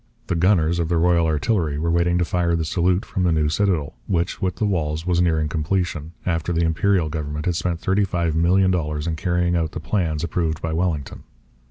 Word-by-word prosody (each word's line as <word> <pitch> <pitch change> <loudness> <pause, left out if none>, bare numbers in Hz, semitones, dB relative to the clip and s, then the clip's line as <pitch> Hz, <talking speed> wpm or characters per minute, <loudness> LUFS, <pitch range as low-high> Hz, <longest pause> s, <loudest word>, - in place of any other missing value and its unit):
The - - -1
gunners 85 -1 +2
of 80 -1 -1
the 85 - +1
Royal 85 0 +3
Artillery 80 -1 0
were 85 +2 0
waiting 85 +1 +2
to 90 - +1
fire 85 -1 0
the 80 -1 -1
salute 90 +4 +1
from 95 - -3
the 90 -1 +2
new 75 -2 +1
citadel, 80 -4 0
which, 85 -3 -1
with 90 -1 -1
the 110 - -1
walls, 80 -5 -1
was 90 -1 +2
nearing 80 -3 +1
completion, 80 0 -2
after 85 -1 -1
the 85 0 +1
Imperial 90 +1 +1
government 75 -1 -4
had 90 - 0
spent 85 0 -2
thirty 95 +4 +1
five 85 -4 -1
million 95 +3 +3
dollars 75 -4 -2
in 85 -2 -1
carrying 90 +1 0
out 80 -2 -1
the - - -4
plans 80 -3 -1
approved 80 -1 -1
by 80 -1 -3
Wellington. 80 -5 -2
85 Hz, 210 wpm, -22 LUFS, 80-90 Hz, -, Royal